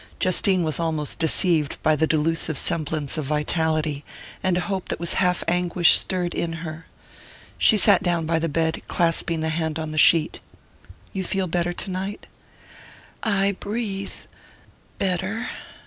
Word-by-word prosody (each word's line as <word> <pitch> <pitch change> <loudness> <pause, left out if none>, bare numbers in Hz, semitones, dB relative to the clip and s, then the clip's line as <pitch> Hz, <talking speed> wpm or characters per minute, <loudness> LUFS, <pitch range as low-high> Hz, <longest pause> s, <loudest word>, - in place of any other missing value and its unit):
Justine 185 0 +3
was 155 0 -1
almost 160 -3 -2
deceived 160 -2 +3
by 155 - +4
the 160 +2 +1
delusive 160 0 0
semblance 155 -1 -2
of 150 - -3
vitality, 155 0 -1 0.4
and 185 -2 +1
a - - 0
hope 190 -1 -3
that - - -1
was 170 0 -1
half 180 -1 +1
anguish 175 0 +4
stirred 180 -2 -1
in 165 0 -3
her. 155 +1 -8 0.7
She 220 - +5
sat 200 -2 +5
down 170 -2 0
by 165 0 +1
the 165 0 -1
bed, 160 +2 -1
clasping 165 -1 0
the 160 - -1
hand 160 -1 -2
on 160 -1 -4
the 155 - -1
sheet. 165 0 +4 0.7
"You 190 - -2
feel 190 +1 -1
better 175 0 -1
tonight?" 190 +2 -4 1.0
"I 200 -2 +1
breathe...better...." 200 -1 -5
170 Hz, 145 wpm, -23 LUFS, 160-185 Hz, 1.0 s, She